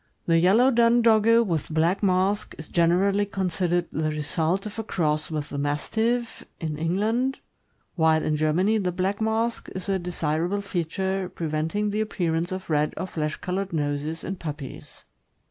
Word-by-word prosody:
The 165 -1 +4
yellow 220 +10 +5
dun 235 0 +4
Dogge, 230 +1 +5
with 165 -5 -2
black 165 +5 +2
mask, 195 +1 +1
is 155 - -9
generally 185 +4 +3
considered 180 -2 0
the 155 0 -1
result 160 +5 -1
of 210 +1 -6
a - - -2
cross 155 -5 -1
with 150 -2 -3
the 140 - -4
Mastiff, 220 +12 -1 0.2
in 155 -3 -3
England, 215 - 0 0.6
while 160 -2 +3
in 155 - 0
Germany 175 +8 +2
the 180 -3 0
black 190 +4 -1
mask 225 +1 -1
is 190 - -5
a 195 -1 +1
desirable 175 +2 -1
feature, 190 +1 -2
preventing 165 +5 -2
the 210 +1 0
appearance 175 -5 -1
of 185 0 -5
red 150 0 +1
or - - -2
flesh 155 -4 -3
colored 190 +1 -3
noses 150 +1 -2
in 190 +1 -4
puppies. 150 -5 -8
180 Hz, 160 wpm, -25 LUFS, 160-205 Hz, 0.6 s, yellow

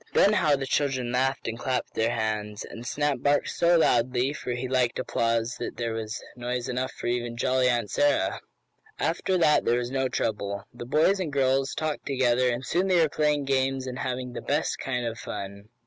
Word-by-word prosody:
Then 205 - +5
how 155 -8 +3
the 135 -1 -3
children 130 -3 0
laughed 130 +1 0
and 115 +1 -4
clapped 130 0 -2
their 110 +1 +1
hands! 105 -2 -2
And 115 +1 -9
Snap 145 -1 0
barked 145 0 +2
so 170 0 +3
loudly 125 -2 +2
for 125 - -4
he 125 +1 -3
liked 125 -2 +1
applause 115 0 0
that 120 - -5
there 115 -1 -2
was 110 0 -5
noise 125 0 -3
enough 125 0 -2
for - - -9
even 120 -1 -1
jolly 130 +1 +2
Aunt 120 -3 0
Sarah. 290 0 +1 0.6
After 185 - 0
that 155 -3 +4
there 120 - +2
was 120 0 -3
no 130 -1 0
trouble. 100 -4 -2
The 120 0 -8
boys 160 +8 +3
and 170 -5 -2
girls 135 0 +1
talked 155 -1 -3
together 125 -2 +2
and 120 +2 -2
soon 180 +3 +1
they 185 -2 +4
were 160 -2 +4
playing 150 -1 +1
games, 135 -1 0
and 130 0 -5
having 125 -1 -3
the - - -5
best 145 +3 -1
kind 125 -2 -2
of 115 0 -4
fun. 100 +1 -7
125 Hz, 200 wpm, -27 LUFS, 120-140 Hz, 0.6 s, Then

